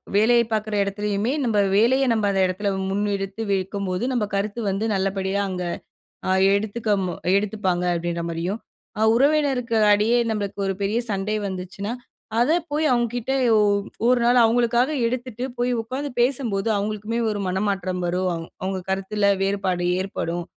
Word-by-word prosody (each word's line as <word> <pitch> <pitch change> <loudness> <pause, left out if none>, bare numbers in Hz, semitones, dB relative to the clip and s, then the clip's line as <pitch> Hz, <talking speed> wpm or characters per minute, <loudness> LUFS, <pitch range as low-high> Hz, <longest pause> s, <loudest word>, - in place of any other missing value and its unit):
வேலைய 235 +3 +5
பார்க்கிற 215 0 -1
இடத்திலேயுமே, 205 +4 -1
நம்ம 220 -3 +1 0.2
வேலைய 245 +6 +4
நம்ம 215 -2 +1
அந்த 195 -1 +1
இடத்தில 200 +3 -2 0.2
முன்னெடுத்து 200 +1 -2
வைக்கும்போது, 190 +1 -2
நம்ம 235 -4 +1
கருத்து 205 +3 -2
வந்து 200 +4 -1
நல்லபடியா 195 +1 -1
அங்கு 180 -1 -3 0.6
அ - - +3 0.2
எடுத்துக்க 215 +2 -3 0.5
எடுத்துப்பாங்க. 195 -4 -1
அப்படின்ற 170 0 -2
மாதிரியும். 175 +6 -3 0.4
அ - - +4
உறவினருக்கு 270 -3 +2 0.2
இடையே 215 +4 +3
நம்மளுக்கு 205 -2 -3
ஒரு 195 - 0
பெரிய 205 +4 0
சண்டை 200 +2 -1
வந்துச்சுன்னா, 190 +4 -5 0.5
அதை 280 +8 +4 0.2
போய் 305 +1 +1
அவங்க 240 -1 +2
கிட்ட 245 +2 -2 0.8
ஒரு 250 -1 +4
நாள் 245 +1 +4
அவங்களுக்காக 240 +4 +2 0.2
எடுத்துட்டு 245 0 -4
போய் 245 +1 +1
உட்கார்ந்து 265 +5 -5
பேசும்போது, 240 -6 0
அவங்களுக்குமே 215 +3 -2
ஒரு 205 -1 -3
மனமாற்றம் 185 -1 -1
வரும். 180 +1 0 0.3
அவங்க 190 0 -2
கருத்தில 200 +1 +1
வேறுபாடு 190 -3 0 0.2
ஏற்படும். 175 -3 -3
205 Hz, 135 wpm, -23 LUFS, 195-235 Hz, 0.8 s, வேலைய